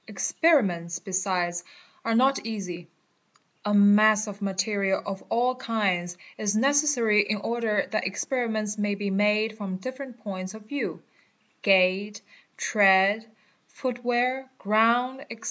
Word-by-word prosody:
Experiments 190 Hz, -, +1 dB
besides 185 Hz, -3 st, -2 dB, 0.4 s
are 230 Hz, 0 st, 0 dB
not 265 Hz, +3 st, +3 dB
easy. 185 Hz, -6 st, -6 dB, 0.8 s
A 210 Hz, -, -1 dB
mass 210 Hz, +1 st, +5 dB
of 205 Hz, -1 st, -9 dB
material 195 Hz, 0 st, -1 dB
of 195 Hz, -1 st, -6 dB
all 245 Hz, +2 st, +1 dB
kinds 195 Hz, -8 st, -2 dB, 0.2 s
is 210 Hz, -1 st, 0 dB
necessary 260 Hz, -4 st, +3 dB
in 210 Hz, +1 st, -1 dB
order 220 Hz, -1 st, -1 dB
that 215 Hz, -3 st, -1 dB
experiments 220 Hz, 0 st, -2 dB
may 205 Hz, 0 st, 0 dB
be 200 Hz, 0 st, -3 dB
made 210 Hz, +2 st, +1 dB
from 195 Hz, -3 st, -5 dB
different 255 Hz, +3 st, -8 dB
points 190 Hz, -1 st, -6 dB
of 220 Hz, -, -12 dB
view 285 Hz, +6 st, -5 dB, 0.6 s
(gait, 195 Hz, +1 st, +3 dB, 0.4 s
tread, 200 Hz, +1 st, +4 dB, 0.4 s
footwear, 250 Hz, +1 st, -2 dB
ground, 235 Hz, +5 st, +2 dB
&c). 230 Hz, -, -8 dB
210 Hz, 120 wpm, -26 LUFS, 195-235 Hz, 0.8 s, mass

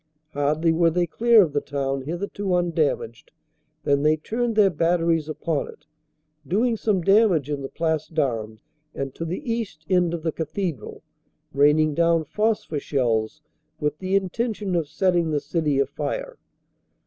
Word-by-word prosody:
Hardly 150 Hz, +3 st, +1 dB
were 165 Hz, +1 st, +3 dB
they 175 Hz, +2 st, +1 dB
clear 225 Hz, +5 st, +5 dB
of 155 Hz, -5 st, -3 dB
the 145 Hz, -, +1 dB
town, 135 Hz, -1 st, -2 dB
hitherto 185 Hz, +3 st, -2 dB
undamaged, 460 Hz, -, -1 dB, 0.5 s
than 140 Hz, -1 st, +2 dB
they 155 Hz, +1 st, +3 dB
turned 230 Hz, +8 st, -2 dB
their 205 Hz, -3 st, +5 dB
batteries 165 Hz, -1 st, +1 dB
upon 155 Hz, 0 st, -2 dB
it, -, -, -14 dB, 0.6 s
doing 225 Hz, -, +1 dB
some 210 Hz, -4 st, 0 dB
damage 195 Hz, -, +3 dB
in 145 Hz, -1 st, -2 dB
the 135 Hz, -, -5 dB
Place 160 Hz, -2 st, -1 dB
d 160 Hz, -, -4 dB
Armes 110 Hz, -5 st, -2 dB, 0.3 s
and 135 Hz, -1 st, -4 dB
to -, -, -6 dB
the 230 Hz, -, -3 dB
east 195 Hz, -10 st, -5 dB
end 175 Hz, -2 st, +3 dB
of 165 Hz, -, -7 dB
the 165 Hz, -, 0 dB
cathedral, 160 Hz, -, -4 dB, 0.5 s
raining 150 Hz, +2 st, +4 dB
down 165 Hz, +1 st, +2 dB
phosphor 210 Hz, -4 st, -1 dB
shells 125 Hz, 0 st, -1 dB, 0.4 s
with 150 Hz, 0 st, -2 dB
the 190 Hz, +1 st, -1 dB
intention 200 Hz, +1 st, -1 dB
of 165 Hz, -3 st, 0 dB
setting 175 Hz, 0 st, +1 dB
the 150 Hz, -1 st, +1 dB
city 150 Hz, 0 st, -1 dB
afire. -, -, -3 dB
165 Hz, 155 wpm, -24 LUFS, 150-195 Hz, 0.6 s, clear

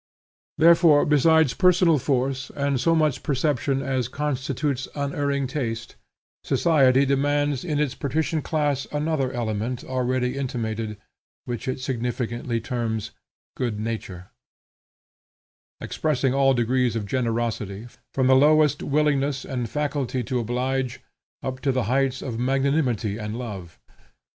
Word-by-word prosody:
Therefore 165 Hz, -2 st, +6 dB
besides 155 Hz, -1 st, +4 dB
personal 180 Hz, -4 st, +4 dB
force 130 Hz, 0 st, -1 dB
and 140 Hz, -2 st, 0 dB
so 165 Hz, 0 st, +3 dB
much 155 Hz, -3 st, +1 dB
perception 140 Hz, -1 st, 0 dB
as 130 Hz, -3 st, -1 dB
constitutes 135 Hz, -1 st, -2 dB
unerring 140 Hz, -1 st, -1 dB
taste, 120 Hz, -5 st, -4 dB, 0.5 s
society 140 Hz, -5 st, +3 dB
demands 145 Hz, 0 st, +1 dB
in 155 Hz, -4 st, -2 dB
its 150 Hz, -4 st, 0 dB
patrician 155 Hz, +2 st, -1 dB
class 145 Hz, -3 st, -1 dB
another 150 Hz, -3 st, -1 dB
element 120 Hz, +1 st, -3 dB
already 130 Hz, 0 st, -1 dB
intimated, 110 Hz, -5 st, -3 dB, 0.5 s
which 120 Hz, 0 st, -5 dB
it 130 Hz, -, -2 dB
significantly 120 Hz, -2 st, -2 dB
terms 110 Hz, -1 st, -3 dB, 0.4 s
good 120 Hz, -5 st, -2 dB
nature, 105 Hz, -3 st, -5 dB, 1.5 s
expressing 140 Hz, -4 st, 0 dB
all 135 Hz, -1 st, +3 dB
degrees 125 Hz, 0 st, +1 dB
of 110 Hz, -3 st, -2 dB
generosity, 115 Hz, -3 st, -2 dB, 0.3 s
from 130 Hz, -, 0 dB
the 130 Hz, +1 st, +6 dB
lowest 150 Hz, +1 st, +4 dB
willingness 145 Hz, -2 st, +1 dB
and 125 Hz, -4 st, -3 dB
faculty 140 Hz, -3 st, -2 dB
to 125 Hz, +2 st, -1 dB
oblige, 125 Hz, +2 st, -2 dB, 0.4 s
up 130 Hz, 0 st, -4 dB
to 135 Hz, -, +1 dB
the 130 Hz, -1 st, 0 dB
heights 130 Hz, +3 st, 0 dB
of 120 Hz, -4 st, -4 dB
magnanimity 130 Hz, -5 st, 0 dB
and 105 Hz, +1 st, -4 dB
love. 100 Hz, -9 st, -7 dB
130 Hz, 120 wpm, -24 LUFS, 120-145 Hz, 1.5 s, Therefore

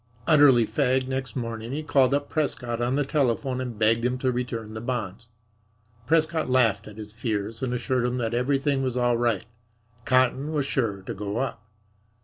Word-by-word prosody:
Utterly 140 Hz, -6 st, +6 dB
fagged 130 Hz, 0 st, +1 dB
next 130 Hz, -1 st, -4 dB
morning, 115 Hz, -2 st, -4 dB
he 155 Hz, +2 st, -3 dB
called 140 Hz, -3 st, +3 dB
up 145 Hz, 0 st, -2 dB
Prescott 125 Hz, -6 st, -2 dB
on 125 Hz, +2 st, +1 dB
the 145 Hz, 0 st, +1 dB
telephone 130 Hz, -2 st, 0 dB
and 125 Hz, -4 st, -5 dB
begged 115 Hz, +2 st, +2 dB
him 125 Hz, +1 st, 0 dB
to 130 Hz, 0 st, 0 dB
return 120 Hz, -3 st, -4 dB
the 110 Hz, -, -6 dB
bonds. 115 Hz, -3 st, -4 dB, 0.8 s
Prescott 160 Hz, -1 st, +1 dB
laughed 115 Hz, -5 st, +2 dB
at 105 Hz, 0 st, -11 dB
his 105 Hz, -1 st, -8 dB
fears 110 Hz, -1 st, -3 dB
and 130 Hz, -2 st, -1 dB
assured 125 Hz, 0 st, 0 dB
him 125 Hz, +1 st, -2 dB
that 115 Hz, -2 st, -2 dB
everything 135 Hz, +3 st, +1 dB
was 130 Hz, -2 st, -1 dB
all 120 Hz, -1 st, +2 dB
right. 115 Hz, -3 st, 0 dB, 0.6 s
Cotton 130 Hz, +4 st, +2 dB
was 145 Hz, -3 st, 0 dB
sure 110 Hz, -8 st, -1 dB
to -, -, -5 dB
go 100 Hz, +2 st, -4 dB
up. 130 Hz, -5 st, -3 dB
125 Hz, 180 wpm, -25 LUFS, 115-135 Hz, 0.8 s, Utterly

